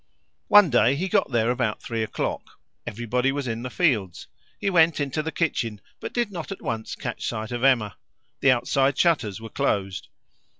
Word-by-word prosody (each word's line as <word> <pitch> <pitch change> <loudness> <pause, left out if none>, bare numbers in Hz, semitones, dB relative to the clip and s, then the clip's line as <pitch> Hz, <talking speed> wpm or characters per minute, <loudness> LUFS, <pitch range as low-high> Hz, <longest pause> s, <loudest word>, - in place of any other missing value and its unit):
One 205 -6 +7
day 120 +2 +4
he 180 +7 -2
got - - +1
there 120 -1 +2
about 120 -4 -1
three 115 -1 -4
o'clock. 110 - -4 0.3
Everybody 120 +3 -1
was 140 -1 -3
in 115 0 -3
the 125 - -5
fields. 115 - 0 0.3
He - - -3
went 165 -4 +4
into 145 +1 -1
the 160 +1 -4
kitchen, 115 -11 -1 0.2
but - - -6
did 240 -4 -1
not 175 0 -6
at 195 - -6
once 110 -1 -4
catch - - -5
sight 110 +2 -4
of 120 0 -3
Emma; 120 -6 +2 0.4
the 140 - +4
outside 135 +2 +2
shutters 120 - +1
were 115 0 -9
closed. 100 -9 -1
125 Hz, 180 wpm, -24 LUFS, 115-155 Hz, 0.4 s, One